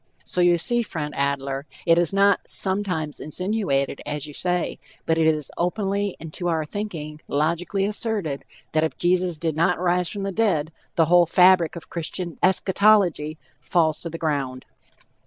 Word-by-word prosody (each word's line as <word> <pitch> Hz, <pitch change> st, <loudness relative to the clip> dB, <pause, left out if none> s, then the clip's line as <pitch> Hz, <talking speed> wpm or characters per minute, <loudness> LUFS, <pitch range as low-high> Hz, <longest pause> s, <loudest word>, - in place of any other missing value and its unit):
So, 180 Hz, -, 0 dB
you 175 Hz, -1 st, +5 dB
see, 240 Hz, +7 st, +1 dB
friend 150 Hz, -9 st, -5 dB
Adler, 140 Hz, 0 st, -2 dB, 0.2 s
it 165 Hz, 0 st, +5 dB
is 175 Hz, -3 st, +2 dB
not 200 Hz, 0 st, +4 dB
"sometimes 190 Hz, -6 st, 0 dB
insinuated," 155 Hz, -5 st, -1 dB
as 150 Hz, -1 st, -4 dB
you 150 Hz, -, -9 dB
say, 180 Hz, +2 st, -1 dB, 0.3 s
but 160 Hz, 0 st, +1 dB
it 160 Hz, -, +4 dB
is 155 Hz, -3 st, 0 dB
openly, 200 Hz, +2 st, -1 dB
and 160 Hz, -1 st, -9 dB
to 175 Hz, -, -3 dB
our 160 Hz, -2 st, 0 dB
thinking, 155 Hz, -5 st, -6 dB
logically 170 Hz, +6 st, 0 dB
asserted, 205 Hz, -, -2 dB, 0.3 s
that 155 Hz, 0 st, +2 dB
if 160 Hz, -, -2 dB
Jesus 180 Hz, -1 st, +1 dB
did 160 Hz, -1 st, -2 dB
not 170 Hz, +3 st, +2 dB
rise 180 Hz, -1 st, +1 dB
from 200 Hz, -2 st, -5 dB
the 195 Hz, -, -2 dB
dead, 180 Hz, -7 st, +1 dB, 0.2 s
the 165 Hz, -, +4 dB
whole 175 Hz, +1 st, +5 dB
fabric 180 Hz, -1 st, +5 dB
of 170 Hz, -, -10 dB
Christian 170 Hz, +1 st, -4 dB
eschatology 190 Hz, -4 st, +3 dB, 0.2 s
falls 160 Hz, -3 st, +1 dB
to 170 Hz, -, -6 dB
the 165 Hz, -, -6 dB
ground. 140 Hz, -5 st, -2 dB
170 Hz, 165 wpm, -23 LUFS, 155-190 Hz, 0.3 s, you